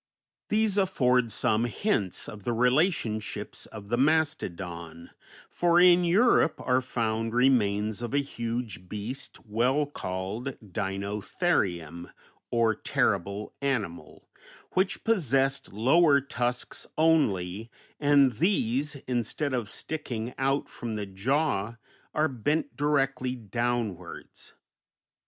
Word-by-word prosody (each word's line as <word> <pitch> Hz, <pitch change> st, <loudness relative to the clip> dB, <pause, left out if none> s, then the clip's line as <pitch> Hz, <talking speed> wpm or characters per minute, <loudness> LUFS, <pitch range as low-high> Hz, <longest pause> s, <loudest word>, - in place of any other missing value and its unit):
These 215 Hz, -2 st, +2 dB
afford 125 Hz, -, +2 dB
some 110 Hz, +2 st, +1 dB
hints 115 Hz, -, -1 dB
of 105 Hz, -2 st, -9 dB
the 120 Hz, -, -1 dB
relationships 125 Hz, -, 0 dB
of 105 Hz, -2 st, -10 dB
the 120 Hz, +1 st, +1 dB
mastodon; 90 Hz, -, -1 dB, 0.4 s
for 175 Hz, 0 st, +3 dB
in 180 Hz, 0 st, +7 dB
Europe 180 Hz, -1 st, +4 dB
are 125 Hz, +1 st, +3 dB
found 115 Hz, -2 st, -2 dB
remains 110 Hz, -4 st, +2 dB
of 120 Hz, -, -4 dB
a 140 Hz, -, +1 dB
huge 115 Hz, -8 st, -4 dB
beast 105 Hz, +6 st, -6 dB
well 125 Hz, +7 st, +1 dB
called 105 Hz, +1 st, -5 dB, 0.2 s
Dinotherium, 100 Hz, -, -2 dB, 0.4 s
or 115 Hz, -2 st, +3 dB
terrible 100 Hz, -1 st, -1 dB
animal, 115 Hz, -12 st, -3 dB, 0.4 s
which 190 Hz, +1 st, 0 dB
possessed 135 Hz, -, +1 dB
lower 140 Hz, -, +4 dB
tusks 125 Hz, -3 st, -3 dB
only, 110 Hz, -, +2 dB, 0.3 s
and 145 Hz, -2 st, +5 dB
these, 145 Hz, -, 0 dB
instead 125 Hz, +4 st, -1 dB
of 120 Hz, -5 st, -1 dB
sticking 125 Hz, -7 st, -4 dB
out 135 Hz, +1 st, +1 dB
from 115 Hz, -2 st, -6 dB
the 105 Hz, -1 st, -3 dB
jaw 115 Hz, +2 st, -1 dB, 0.4 s
are 155 Hz, +1 st, +3 dB
bent 145 Hz, +2 st, -1 dB
directly 135 Hz, -2 st, 0 dB
downwards. 115 Hz, -5 st, -4 dB
120 Hz, 105 wpm, -28 LUFS, 105-145 Hz, 0.4 s, in